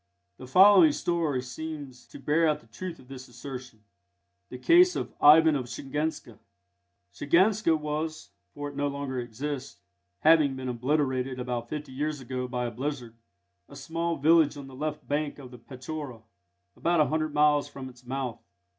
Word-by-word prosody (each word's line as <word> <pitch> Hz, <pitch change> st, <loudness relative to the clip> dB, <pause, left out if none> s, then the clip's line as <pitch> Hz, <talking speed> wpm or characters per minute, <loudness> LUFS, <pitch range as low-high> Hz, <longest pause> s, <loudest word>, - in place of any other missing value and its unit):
The 130 Hz, -, -10 dB
following 205 Hz, -, +7 dB
story 165 Hz, -, -1 dB
seems 140 Hz, -1 st, -8 dB
to -, -, -12 dB
bear 150 Hz, +4 st, +2 dB
out 150 Hz, -, +1 dB
the -, -, -22 dB
truth 170 Hz, +10 st, -7 dB
of 125 Hz, -, -18 dB
this 130 Hz, -1 st, -10 dB
assertion: 125 Hz, -2 st, -9 dB, 0.7 s
THE 125 Hz, -, -7 dB
CASE 355 Hz, -, +5 dB
OF -, -, -4 dB
IVAN 155 Hz, +1 st, +7 dB
OF 130 Hz, -3 st, -3 dB
SHIGANSKA 135 Hz, -2 st, -4 dB, 0.7 s
Shiganska 175 Hz, -, +3 dB
was 155 Hz, +1 st, -4 dB, 0.2 s
for 145 Hz, 0 st, -5 dB
it 145 Hz, -, -12 dB
no 145 Hz, +1 st, 0 dB
longer 140 Hz, -2 st, -4 dB
exists, 125 Hz, -1 st, -5 dB, 0.4 s
having 155 Hz, -4 st, +5 dB
been 130 Hz, -1 st, -5 dB
obliterated 130 Hz, 0 st, -1 dB
about 120 Hz, -1 st, -4 dB
fifty 150 Hz, -2 st, -6 dB
years 145 Hz, +2 st, -3 dB
ago 125 Hz, 0 st, -4 dB
by 125 Hz, -1 st, -3 dB
a 120 Hz, -, -3 dB
blizzard 125 Hz, -1 st, -5 dB, 0.6 s
a -, -, -12 dB
small 165 Hz, +4 st, -3 dB
village 155 Hz, 0 st, +4 dB
on 140 Hz, -, -8 dB
the 135 Hz, -, -12 dB
left 150 Hz, +3 st, -5 dB
bank 145 Hz, 0 st, -2 dB
of 130 Hz, -3 st, -11 dB
the 125 Hz, -, -12 dB
Petchora, 130 Hz, -1 st, -8 dB, 0.5 s
about 170 Hz, 0 st, +1 dB
a 150 Hz, -, +5 dB
hundred 155 Hz, +2 st, -1 dB
miles 150 Hz, -1 st, +3 dB
from 135 Hz, -1 st, -9 dB
its 125 Hz, -1 st, -15 dB
mouth. 125 Hz, -2 st, -4 dB
145 Hz, 165 wpm, -27 LUFS, 125-155 Hz, 0.7 s, following